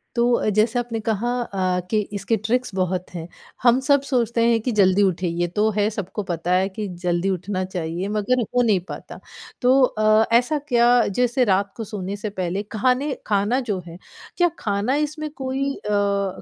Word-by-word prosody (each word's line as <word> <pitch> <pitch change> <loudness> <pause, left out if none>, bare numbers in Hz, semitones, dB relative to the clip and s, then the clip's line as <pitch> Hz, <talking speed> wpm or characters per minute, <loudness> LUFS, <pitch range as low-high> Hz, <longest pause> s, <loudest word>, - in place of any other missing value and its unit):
तो 240 +1 +2
अ, 215 - +1
जैसे 220 +4 +2
आपने 230 -2 -3
कहा 230 +3 0
अ, 185 -5 -1
कि 215 - +3
इसके 205 +3 -1
ट्रिक्स 225 +1 -1
बहुत 185 -1 -1
हैं, 165 0 -5 0.4
हम 245 +1 +5
सब 285 -1 +5
सोचते 235 -2 +1
हैं 230 -1 +3
कि 250 - -1
जल्दी 190 +2 +4
उठें, 185 -1 0
ये 170 +1 -1
तो 215 - +4
है 205 +1 +2
सबको 205 0 -5
पता 170 +1 -2
है 190 +1 +2
कि 205 +1 -5 0.2
जल्दी 175 +2 +1
उठना 185 +1 -2
चाहिए, 175 0 -4
मगर 215 +4 +1
हो 245 +2 0
नहीं 215 -6 +3
पाता। - - -8 0.4
तो 260 +2 +4
अ, 215 -2 +3
ऐसा 290 +5 0
क्या 240 -2 +4 0.3
जैसे 250 +1 +2
रात 195 +1 -1
को 225 - -4
सोने 195 0 -4
से 210 +1 -4
पहले 185 +3 -2
खाने 255 +6 +1
खाना 210 +5 +1
जो 190 - -1
है, 165 - -9 0.4
क्या 350 -1 +4
खाना 205 +6 0
इसमें 305 0 -6
कोई 270 +1 -1
अ, 200 -2 -1
210 Hz, 185 wpm, -22 LUFS, 190-245 Hz, 0.4 s, हम